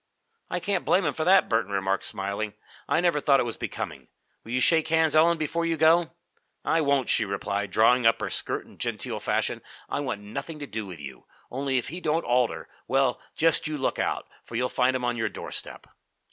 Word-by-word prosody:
"I 180 - -1
can't 200 +3 -1
blame 185 0 +3
him 145 - +1
for 155 - -2
that," 190 +1 +6
Burton 115 -3 0
remarked, 95 0 0
smiling. 100 +2 -3 0.3
"I 165 - +3
never 170 -4 +2
thought 140 -2 +4
it 120 -2 -2
becoming. - - -5 0.4
Will 115 - -9
you 125 - +1
shake 160 +4 +3
hands, 160 -1 +2
Ellen, 165 +2 +5
before 160 +2 -1
you 165 -1 0
go?" 165 +2 +4 0.5
"I 165 - +2
won't!" 140 -3 +2
she 110 - +3
replied, 100 0 -2
drawing 115 +4 +4
up 115 - +4
her - - -3
skirt - - -3
in - - -18
genteel - - -3
fashion. - - -1 0.3
"I - - -1
want 125 -8 -3
nothing 110 +10 -6
to 145 - -6
do 110 -5 -5
with 90 -3 -9
you. - - -10 0.2
Only, 135 +1 -1
if 125 - -2
he 175 +2 -6
don't 160 +1 0
alter, 125 -1 +1 0.2
well, 135 -1 +2
just 165 0 +3
you 155 -1 -3
look 135 - -1
out, - - -1 0.2
for - - -10
you'll 125 +2 +1
find 130 +1 +2
him 125 -1 -1
on 120 -1 0
your 115 - 0
doorstep." - - -7
135 Hz, 210 wpm, -26 LUFS, 115-160 Hz, 0.5 s, that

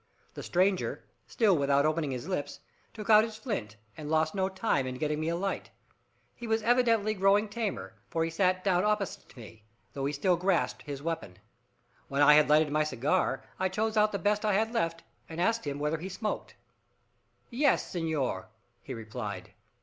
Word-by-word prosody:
The - - -7
stranger, 185 +1 0 0.2
still 210 -5 +3
without 140 -1 +2
opening 155 -1 0
his 130 +3 -5
lips, 185 -7 -3 0.3
took 215 -2 -8
out 215 0 +8
his 220 -1 -5
flint, 200 - -4 0.2
and 150 -2 -7
lost 160 0 +2
no 190 -1 0
time 190 - 0
in 130 - -4
getting 150 +2 -1
me 155 +1 -1
a 170 - 0
light. 195 +3 -3 0.6
He 235 - -8
was 220 0 +1
evidently 230 -3 +3
growing 200 +2 +3
tamer, 205 - -4 0.2
for 165 - 0
he 165 - -2
sat 185 +2 +1
down 185 -2 +2
opposite 210 -2 -1
to - - -19
me, 110 -2 -12 0.3
though 135 -1 -3
he 145 - -1
still 175 +5 +2
grasped 180 0 0
his 140 -2 -7
weapon. 160 - -4 0.7
When 140 +1 +2
I 150 +1 +8
had 150 0 +5
lighted 150 0 +4
my 155 +1 +2
cigar, 150 +5 0 0.2
I 190 0 +1
chose 220 +3 -1
out 215 0 +4
the 200 - -1
best 205 +3 0
I 210 -1 +2
had 220 +3 +1
left, 165 -7 -1 0.3
and 165 0 -7
asked 225 0 +1
him 140 0 -2
whether 150 +2 -1
he 185 +4 -6
smoked. 210 +3 -4 1.0
"Yes, 275 +3 +2
senor," 160 -6 -2 0.3
he - - -7
replied. 110 -4 -6
175 Hz, 190 wpm, -29 LUFS, 150-210 Hz, 1.0 s, out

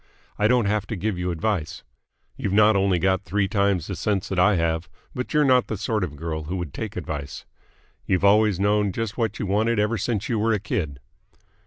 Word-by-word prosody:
I 105 - +4
don't 120 -1 +3
have 105 0 0
to 110 - -3
give 100 0 -2
you 90 0 -1
advice. 85 -1 -2 0.5
You've 100 - -3
not 105 +1 +5
only 95 -2 +2
got 95 +2 +1
three 100 +3 0
times 100 -4 +1
the 95 - -4
sense 100 +1 -1
that 95 - -1
I 105 +3 +5
have, 80 +1 -1 0.2
but 125 - -4
you're 150 -1 +3
not 130 -2 +4
the 110 - -3
sort 105 +1 -1
of 80 -5 -4
girl 80 0 -4
who 90 +5 -3
would 85 -6 -5
take 110 -1 -5
advice. 75 -5 -5 0.6
You've 95 0 +2
always 105 -1 +4
known 100 -1 +2
just 115 0 -3
what 115 -4 -1
you - - -3
wanted 110 +4 +1
ever 105 +1 +1
since 110 +1 -2
you 115 -3 0
were 110 +1 +2
a 105 - 0
kid. 90 - -3
100 Hz, 215 wpm, -24 LUFS, 90-110 Hz, 0.6 s, not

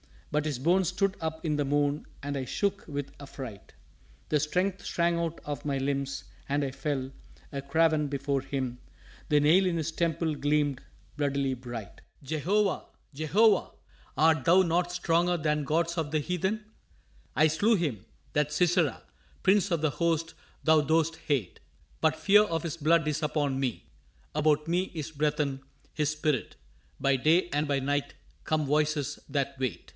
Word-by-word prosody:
But 150 +1 0
his 145 -5 -2
bones 175 +6 +3
stood 195 +1 0
up 160 +1 -4
in 150 -2 +1
the 145 - +1
moon 145 +1 +1 0.2
and 145 0 -2
I 130 - -3
shook 200 +8 -1
with 145 -2 -4
affright. 130 -7 -9 0.6
The 150 - +3
strength 180 +6 0
shrank 170 0 +1
out 165 -1 -3
of 145 0 -5
my 140 -2 0
limbs 140 0 -2 0.2
and 145 +1 0
I 135 - -2
fell, 135 -1 -3 0.4
a 140 - -4
craven, 155 +1 +2
Before 140 -1 -1
him 130 -2 -3 0.5
the 150 -1 +4
nail 170 +6 +5
in 180 -2 +1
his 165 -1 -1
temple 165 -1 0
gleamed 145 -2 +1 0.4
bloodily 140 -2 0
bright. 120 -5 -8 0.2
Jehovah! 180 +8 0 0.3
Jehovah! 185 +8 +3 0.5
art 160 -3 +4
Thou 180 +3 +6
not 175 0 +1
stronger 175 0 +2
than 150 -2 0
gods 170 +4 0
of 155 -3 -1
the 155 - +2
heathen? 190 +7 -1 0.7
I 155 - +5
slew 205 +9 +3
him, 140 - -2 0.3
that 150 0 0
Sisera, 175 +2 +2 0.4
prince 200 +1 +4
of 170 -4 0
the 155 -2 +2
host 165 0 0 0.3
Thou 160 0 +5
dost 160 +2 +1
hate. 130 - -1 0.4
But 160 -1 +2
fear 205 +5 +5
of 165 -6 -2
his 170 -1 -4
blood 165 +1 +3
is 150 +1 -1
upon 145 -3 0
me, 130 -4 -2 0.5
about 150 0 +2
me 180 +3 0
is 155 -1 -4
breathen 150 -2 0 0.3
His 150 -2 0
spirit 150 -5 -1 0.5
by 140 -1 +3
day 165 +7 +3
and 150 +1 0
by 140 -1 +1
night 145 +1 -1 0.3
come 155 -1 +1
voices 150 0 0
that 140 -1 -2
wait. 120 -10 -3
150 Hz, 160 wpm, -29 LUFS, 140-165 Hz, 0.7 s, Thou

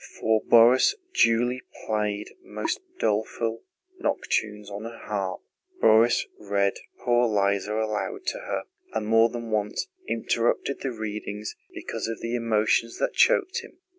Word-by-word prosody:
For 110 -1 +2
Borís, 120 - +6 0.2
Julie 120 +2 +3 0.2
played 105 -1 -1
most 370 - -3 0.2
doleful 115 - -1 0.4
nocturnes 105 - -1
on 100 +2 -6
her 115 0 -7
harp. 100 -3 -3 0.4
Borís 115 - +5
read 100 -1 +1 0.3
Poor 120 -1 +4
Liza 100 -1 +1
aloud 110 -1 -2
to - - -2
her, - - -3 0.3
and 110 -1 -1
more 115 +1 +5
than 115 -1 -6
once 105 -1 -1 0.2
interrupted 115 +4 0
the 135 - -2
reading 105 -2 -5 0.3
because - - -5
of 115 -1 -4
the 115 +1 -4
emotions 115 0 +1
that - - 0
choked 470 -3 +3
him. 460 - -13
110 Hz, 135 wpm, -26 LUFS, 105-120 Hz, 0.4 s, Borís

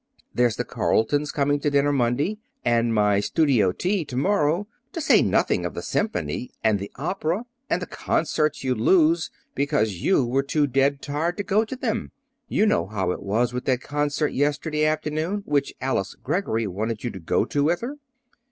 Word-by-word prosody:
There's 120 -3 +2
the - - -2
Carletons 145 +6 +1
coming 145 -1 +1
to 145 - 0
dinner 145 0 +2
Monday, 140 - 0 0.3
and 115 0 +2
my 105 -2 +3
studio 115 - +2
Tea 185 - -1
to 125 -3 -6
morrow, 170 +3 +1 0.3
to - - -3
say 315 - +5
nothing - - +2
of - - -4
the - - -5
Symphony 210 - -2
and 110 -2 +3
the 100 - -6
opera, 175 - -2 0.2
and - - 0
the - - -3
concerts 155 -2 -1
you'd 130 -3 0
lose 165 +4 +4 0.2
because 120 - 0
you 145 -9 +3
were 130 +3 +1
too 145 +2 +1
dead 135 +1 +1
tired 155 +5 -1
to 205 - -2
go 200 +3 +2
to 240 - -6
them. 250 -4 -2 0.4
You 215 - +2
know 85 - +2
how 95 -3 -1
it - - -4
was 115 +5 0
with 125 0 -4
that 130 -1 +1
concert 145 +1 -1
yesterday 150 +2 0
afternoon 155 +6 -1
which 145 -1 0
Alice 125 -6 -1
Greggory 115 - -1
wanted 105 +3 -3
you 120 - -2
to 95 - -8
go 80 - +1
to 145 0 0
with 170 +3 +1
her." 270 +5 -5
145 Hz, 185 wpm, -24 LUFS, 120-160 Hz, 0.4 s, say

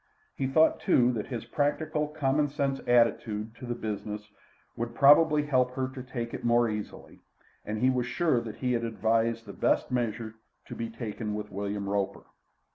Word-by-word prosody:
He 135 - -1
thought, 155 +4 +4
too, 125 0 +3
that 110 -4 -3
his 120 -4 -5
practical, 150 +1 0
common 150 -1 +1
sense 140 -1 -1
attitude 115 -2 +2
to 125 - -8
the 120 - -2
business 105 -1 -5 0.4
would 115 0 -4
probably 150 +2 +6
help 130 -3 +1
her 130 -1 -1
to 130 -1 -8
take 120 -2 -5
it - - -6
more 120 0 +4
easily, 105 -1 -6 0.4
and 105 +1 -4
he 130 +4 +3
was 125 -1 -1
sure 125 -1 +1
that 115 -2 -7
he 125 -1 -1
had 115 -1 0
advised 115 0 0
the 100 - -9
best - - +1
measure 115 -2 -2 0.3
to - - -8
be 115 0 -4
taken 110 -2 -5
with 105 0 -6
William 100 0 -3
Roper. 100 -1 -2
120 Hz, 180 wpm, -28 LUFS, 110-135 Hz, 0.4 s, probably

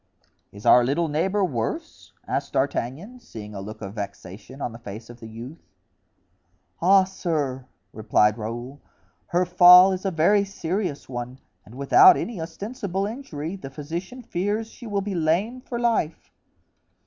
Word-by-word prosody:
"Is 100 +1 -13
our 125 - +7
little 145 +7 0
neighbor 190 +7 +1
worse?" 120 -10 -4 0.2
asked - - -3
D'Artagnan, 170 - -2
seeing 110 - -10
a 100 - -6
look 110 +2 -8
of 100 0 -6
vexation 105 +3 -8
on 125 - -3
the 115 - -11
face 110 +2 -9
of 120 - -15
the 115 - -9
youth. 120 +8 -10 1.2
"Ah, 190 +2 +6
sir!" 150 -9 -3 0.3
replied 105 -1 +2
Raoul, 120 +6 -6 0.5
"her 180 -1 +1
fall 180 +1 +8
is 185 - -5
a 195 - 0
very 190 +4 +3
serious 185 -4 -3
one, 125 0 -6 0.3
and 115 - -13
without 365 - +7
any 220 -7 -4
ostensible 195 +3 -4
injury, 195 - -6
the 185 -8 -8
physician 170 - -7
fears 205 +4 -2
she 240 - -11
will 205 -2 -1
be 200 0 -4
lame 180 +9 0
for 245 -2 -5
life." 225 -10 -1
165 Hz, 150 wpm, -24 LUFS, 120-195 Hz, 1.2 s, fall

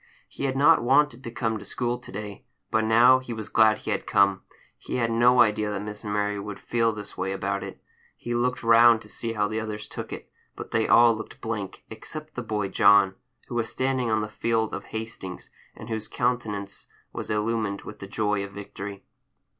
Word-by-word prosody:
He - - -5
had 135 -1 -1
not 150 +4 +6
wanted 130 0 +3
to - - -5
come 115 -2 -2
to - - -10
school 120 0 -2
to 125 - -12
day, 105 0 -7 0.3
but 110 0 +2
now 120 +4 +6
he 130 -2 -7
was 110 -1 -6
glad 110 -1 +5
he - - -5
had - - -2
come. 100 -1 +3 0.4
He - - -5
had 115 -2 +1
no 120 +2 +5
idea 105 0 +2
that 105 -1 -3
Miss 105 0 -7
Mary 105 -1 -1
would 100 0 -7
feel 115 -1 +1
this 105 -1 -8
way 95 - -1
about 100 0 -2
it. - - -8 0.4
He 120 - -4
looked 120 +1 0
round 115 0 +6
to - - -15
see 115 -1 -3
how 105 -2 +1
the 110 +1 -2
others 105 -1 -5
took - - -7
it, - - -7 0.3
but - - -8
they 110 -1 +1
all 120 -1 +6
looked 110 - -9
blank, 105 -4 -5
except 155 +7 -8
the 125 - -4
boy 105 -4 -2
John, 100 -1 +5 0.3
who - - -8
was 115 -2 -1
standing 130 -2 -1
on 110 -1 +2
the 105 - -3
field 110 0 -1
of - - -5
Hastings, 110 -5 -7 0.2
and - - -10
whose 110 -1 -4
countenance 110 -5 -2 0.3
was - - -5
illumined 105 -1 -1
with 105 - -10
the 100 - -8
joy 105 0 -1
of 100 - -7
victory. 100 0 -8
110 Hz, 210 wpm, -26 LUFS, 105-120 Hz, 0.4 s, not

